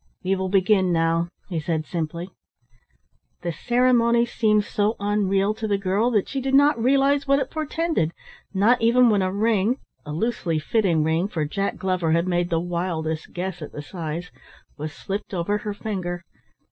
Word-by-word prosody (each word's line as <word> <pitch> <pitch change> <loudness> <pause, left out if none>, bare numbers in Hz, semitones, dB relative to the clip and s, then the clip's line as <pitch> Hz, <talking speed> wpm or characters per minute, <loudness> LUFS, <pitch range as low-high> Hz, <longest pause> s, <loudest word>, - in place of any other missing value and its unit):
"We 190 +1 +1
will 190 0 -2
begin 190 -1 +3
now," 165 0 +2 0.2
he 175 -4 -2
said 155 0 -2
simply. 170 +2 -4 1.1
The 175 - -1
ceremony 240 +4 +3
seemed 215 -3 +2
so 210 +2 0
unreal 200 0 +1
to 220 0 -4
the 200 -1 +1
girl 195 +4 +1
that 210 -5 +1
she 270 - -3
did 270 +1 +1
not 285 -3 +4
realise 275 +3 +3
what 275 0 +4
it 270 -1 -2
portended, 315 - -1 0.4
not 215 +6 +3
even 235 +1 +5
when 205 -2 +3
a 185 0 0
ring 215 +3 +1 0.3
(a 150 - -7
loosely 170 -2 -1
fitting 170 -1 +1
ring, 160 +4 +1
for 160 -7 -2
Jack 195 +7 -2
Glover 185 -4 0
had 170 +2 +1
made 175 -1 0
the 165 -2 +1
wildest 170 -2 -3
guess 180 -1 -4
at 150 - -8
the 145 - -6
size) 170 +1 -5 0.4
was 155 +1 -5
slipped 195 +4 -5
over 205 +4 0
her 210 0 -4
finger. 180 -5 -4
195 Hz, 170 wpm, -24 LUFS, 170-225 Hz, 1.1 s, even